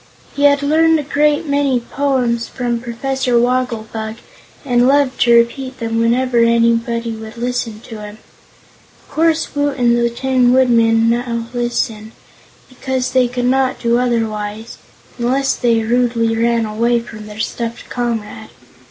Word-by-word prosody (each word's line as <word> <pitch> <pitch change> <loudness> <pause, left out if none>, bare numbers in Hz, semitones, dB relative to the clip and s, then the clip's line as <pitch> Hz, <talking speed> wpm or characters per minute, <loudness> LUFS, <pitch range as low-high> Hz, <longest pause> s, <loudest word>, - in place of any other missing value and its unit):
He 285 - +2
had 285 0 +4
learned 320 +2 +3
a - - -3
great 295 +2 +1
many 280 -3 +1
poems 245 -2 -1
from 240 -2 -3
Professor 250 +1 -1
Wogglebug 230 -3 -2 0.5
and 245 -2 +3
loved 275 -1 +2
to 235 -1 +5
repeat 255 +3 +1
them 225 0 -2
whenever 240 +1 +1
anybody 230 0 +2
would 220 0 -9
listen 235 -2 -3
to 225 -2 -10
him. 210 0 -9 0.9
Of - - -21
course 325 0 +1
Woot 285 -1 -1
and 240 -1 +3
the 235 0 +1
Tin 250 0 +1
Woodman 230 -3 +3
now 235 -1 -2
listened, 230 -2 -2 0.5
because 260 0 -3
they 255 -1 +3
could 245 0 -3
not 260 +1 +1
do 235 0 +1
otherwise 220 -2 -3 0.4
unless 265 +3 +1
they 230 -2 +1
rudely 230 -1 +1
ran 230 0 +1
away 235 +3 +1
from 225 -2 -10
their 210 0 -10
stuffed 230 +1 -4
comrade. 235 -3 -4
240 Hz, 145 wpm, -17 LUFS, 230-260 Hz, 0.9 s, to